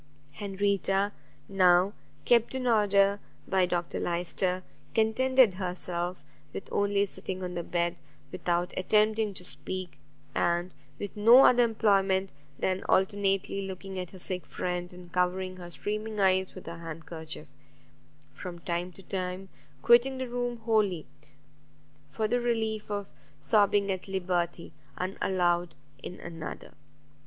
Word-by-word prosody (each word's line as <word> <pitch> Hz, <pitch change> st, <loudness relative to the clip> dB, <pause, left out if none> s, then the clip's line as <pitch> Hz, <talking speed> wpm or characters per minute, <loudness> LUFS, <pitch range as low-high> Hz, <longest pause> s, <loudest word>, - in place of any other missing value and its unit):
Henrietta 200 Hz, +2 st, 0 dB, 0.4 s
now, 185 Hz, 0 st, +4 dB, 0.3 s
kept 235 Hz, +1 st, +4 dB
in 260 Hz, -1 st, -2 dB
order 200 Hz, -3 st, +4 dB, 0.3 s
by 190 Hz, -2 st, +3 dB
Dr 175 Hz, -1 st, -2 dB
Lyster, 180 Hz, +2 st, -1 dB, 0.3 s
contented 245 Hz, +1 st, +4 dB
herself 180 Hz, -1 st, -3 dB, 0.3 s
with -, -, -6 dB
only 200 Hz, 0 st, +2 dB
sitting 190 Hz, -1 st, -5 dB
on 180 Hz, 0 st, -4 dB
the 175 Hz, -, -2 dB
bed, 170 Hz, 0 st, -1 dB, 0.3 s
without 175 Hz, 0 st, -1 dB
attempting 215 Hz, +2 st, +2 dB
to 180 Hz, -, -6 dB
speak, 185 Hz, 0 st, -6 dB, 0.3 s
and 175 Hz, +1 st, 0 dB, 0.2 s
with 205 Hz, -, -6 dB
no 230 Hz, +5 st, +8 dB
other 245 Hz, 0 st, +6 dB
employment 195 Hz, -4 st, +2 dB, 0.3 s
than 190 Hz, 0 st, 0 dB
alternately 195 Hz, 0 st, +1 dB
looking 190 Hz, 0 st, -6 dB
at 180 Hz, -2 st, -4 dB
her 190 Hz, -, -12 dB
sick 180 Hz, 0 st, 0 dB
friend, 180 Hz, 0 st, -3 dB
and 180 Hz, -1 st, -13 dB
covering 185 Hz, +1 st, 0 dB
her 175 Hz, -1 st, -8 dB
streaming 215 Hz, +4 st, -4 dB
eyes 190 Hz, -1 st, +2 dB
with 185 Hz, -, -10 dB
her 165 Hz, 0 st, -7 dB
handkerchief; 160 Hz, -1 st, -7 dB, 0.8 s
from 180 Hz, -1 st, -7 dB
time 175 Hz, +1 st, -3 dB
to 195 Hz, -, -15 dB
time 185 Hz, +1 st, -4 dB, 0.3 s
quitting 240 Hz, +3 st, +5 dB
the 260 Hz, 0 st, -3 dB
room 245 Hz, 0 st, -2 dB
wholly, 210 Hz, -7 st, +1 dB, 1.0 s
for 220 Hz, -1 st, -1 dB
the 245 Hz, +2 st, +1 dB
relief 220 Hz, -3 st, -1 dB
of 205 Hz, -1 st, -2 dB, 0.3 s
sobbing 205 Hz, -2 st, +3 dB
at 185 Hz, 0 st, -4 dB
liberty 180 Hz, -3 st, -2 dB, 0.2 s
and 185 Hz, +1 st, -3 dB
aloud 175 Hz, -2 st, +1 dB, 0.3 s
in 180 Hz, -, -7 dB
another. 165 Hz, -2 st, -7 dB
190 Hz, 130 wpm, -29 LUFS, 180-210 Hz, 1.0 s, no